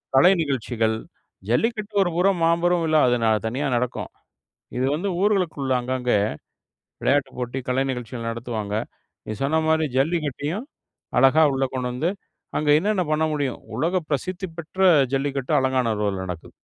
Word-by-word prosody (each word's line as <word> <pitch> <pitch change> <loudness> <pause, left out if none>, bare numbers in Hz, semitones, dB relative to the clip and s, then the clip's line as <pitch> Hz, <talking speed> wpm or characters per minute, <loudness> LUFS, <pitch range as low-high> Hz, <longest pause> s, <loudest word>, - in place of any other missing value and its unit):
கலை 160 +8 +7
நிகழ்ச்சிகள். 120 -6 0 0.5
ஜல்லிக்கட்டு 215 - 0
ஒரு 175 - -1
புறம் 185 0 +3
மாபெரும் 170 +1 +2
விழா. 155 -1 +3
அது 125 0 +3 0.3
தனியா 135 +6 -2
நடக்கும். 120 +1 -2 0.7
இது 130 - +1
வந்து 180 +6 -3
ஊர்களுக்குள்ள 180 -10 +1
அங்கங்க 125 0 -2 0.9
விளையாட்டுப் 140 0 +1
போட்டி 125 +1 -3
கலை 130 +1 +2
நிகழ்ச்சிகள் 120 -2 -5
நடத்துவாங்க, 115 -3 -4 0.5
நீங்க 110 - -5
சொன்ன 155 +4 +2
மாரி 160 -1 +3
ஜல்லிக்கட்டையும் 155 - -1 0.5
அழகா 135 +5 +6
உள்ள 135 0 0
கொண்டு 125 -1 -2
வந்து, 155 +8 0 0.5
அங்க 150 0 0
என்னென்ன 200 +1 +1
பண்ண 155 +1 +2
முடியும். 140 -4 -2 0.2
உலக 175 +3 +1
பிரசித்தி 185 +6 -2
பெற்ற 170 +3 -9 0.3
ஜல்லிக்கட்டு 135 -1 -1
அலங்காநல்லூர்ல 110 -7 0
நடக்கும். 90 -2 -8
140 Hz, 135 wpm, -23 LUFS, 125-170 Hz, 0.9 s, கலை